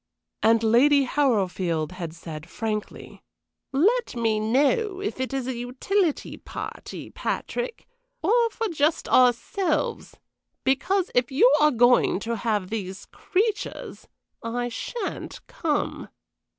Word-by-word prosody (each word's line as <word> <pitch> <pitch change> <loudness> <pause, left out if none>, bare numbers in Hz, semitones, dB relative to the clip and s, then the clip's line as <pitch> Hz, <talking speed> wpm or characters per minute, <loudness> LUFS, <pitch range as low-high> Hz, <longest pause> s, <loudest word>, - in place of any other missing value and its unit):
And 225 0 +4
Lady 275 +6 +5
Harrowfield 190 - 0
had 175 -3 -6
said, 160 0 -9
frankly, 215 0 -5 0.5
"Let 405 - +2
me 225 -2 +1
know 295 - +1
if 400 -8 -4
it 260 +1 -2
is 270 -2 -2
a 260 -1 -3
utility 280 +9 -1
party, - - -8
Patrick, 485 0 -4 0.4
or 470 +1 +3
for 450 0 -3
just 310 -1 +1
ourselves, 255 +8 +1 0.5
because 360 +8 +1
if 245 +1 +1
you 265 0 +5
are 300 - +6
going 245 -6 +4
to 235 +1 -2
have 210 -3 -1
these 195 -3 -5
creatures 420 +2 -3 0.3
I 245 +1 -2
sha'n't 400 - -5
come." 300 -3 -2
255 Hz, 115 wpm, -25 LUFS, 220-335 Hz, 0.5 s, are